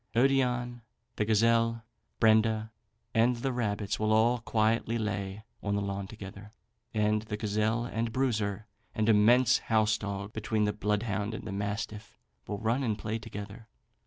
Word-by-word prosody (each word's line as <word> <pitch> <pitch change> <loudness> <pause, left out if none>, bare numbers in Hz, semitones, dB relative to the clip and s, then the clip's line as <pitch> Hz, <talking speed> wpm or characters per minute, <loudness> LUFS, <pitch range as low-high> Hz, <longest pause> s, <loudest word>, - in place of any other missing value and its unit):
Odion, 125 -1 +2 0.4
the 105 - +1
gazelle, 115 +1 +3 0.4
Brenda, 110 0 +3 0.4
and 120 +2 +3
the 130 +2 -2
rabbits, 105 -3 -1
will 110 0 +1
all 115 +3 +4
quietly 115 0 +1
lay 100 -2 -3 0.2
on 100 -1 -1
the 100 - 0
lawn 100 0 -3
together, 105 0 -10 0.4
and 105 0 +1
the 105 -1 -5
gazelle 110 +2 0
and 115 -1 -2
Bruiser, 110 -5 -1 0.3
an 110 -2 +1
immense 120 +4 +5
house 110 -1 +2
dog 100 0 -5
between 110 0 -1
the 105 0 +1
bloodhound 105 0 -1
and - - -7
mastiff, 105 +1 -4 0.3
will 105 - -3
run 115 +5 0
and 110 -5 0
play 110 +1 -3
together. 110 0 -8
110 Hz, 145 wpm, -30 LUFS, 105-115 Hz, 0.4 s, immense